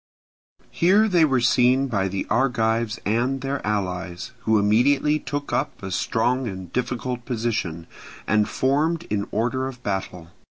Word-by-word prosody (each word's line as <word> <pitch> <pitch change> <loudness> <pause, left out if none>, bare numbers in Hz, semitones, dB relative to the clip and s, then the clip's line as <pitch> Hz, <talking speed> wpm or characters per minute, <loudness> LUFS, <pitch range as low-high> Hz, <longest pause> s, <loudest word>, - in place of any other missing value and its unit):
Here 200 +6 +4
they 175 -5 +4
were 135 -4 +2
seen 125 +3 +4
by 100 -6 0
the 95 0 -3
Argives 115 -2 +1
and 125 +5 0
their 135 +1 -3
allies, 95 -1 -3
who 110 -1 +4
immediately 135 +9 +3
took 145 -1 -5
up 135 - -2
a 95 - -5
strong 120 +7 0
and 95 -4 -7
difficult 125 0 -2
position, 110 -9 -2 0.4
and 105 0 +2
formed 155 +5 +1
in 100 -1 -1
order 125 +4 -1
of 125 -2 -9
battle. 90 -4 -4
120 Hz, 145 wpm, -23 LUFS, 105-135 Hz, 0.4 s, Here